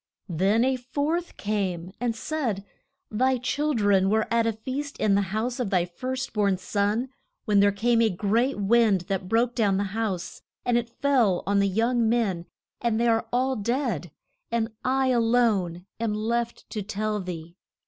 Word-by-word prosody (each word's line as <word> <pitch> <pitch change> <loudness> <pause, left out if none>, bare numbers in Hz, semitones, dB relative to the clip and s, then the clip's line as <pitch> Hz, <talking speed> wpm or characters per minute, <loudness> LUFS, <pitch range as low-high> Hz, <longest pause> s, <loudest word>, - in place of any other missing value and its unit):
Then 195 +8 +2
a 260 0 +1
fourth 290 +7 -2
came, 190 -4 -2
and 240 -1 -1
said, 230 -7 -2 0.5
Thy 255 +4 +2
chil 290 +4 -1
dren 200 -3 +3
were 220 +1 +2
at 230 -1 +3
a 225 - +1
feast 265 +6 -5
in 210 - +2
the 200 - +4
house 230 +5 -2
of 240 -5 -1
thy 180 -3 +2
first 255 +9 -4
born 200 -3 +2
son, 205 +6 -1 0.4
when 210 -3 +3
there 200 0 +5
came 230 +3 +2
a 225 - +4
great 215 +8 +1
wind 210 -2 +3
that 185 +1 -3
broke 235 +2 +2
down 205 -5 +2
the 200 - +1
house, 205 -5 -3 0.2
and 245 - +2
it 235 -1 0
fell 240 -7 +2
on 200 0 +2
the 200 - +3
young 230 +3 +2
men 200 -8 0 0.3
and 230 -2 +1
they 235 - +2
are 225 -1 +2
all 260 +2 +1
dead, 235 - -1 0.4
and 230 -1 -1
I 265 0 +2
a 245 -2 +3
lone 215 -7 +1
am 225 -2 -1
left 235 +2 -2
to 215 - -3
tell 210 +1 -2
thee. 170 -2 -7
225 Hz, 180 wpm, -26 LUFS, 200-245 Hz, 0.5 s, there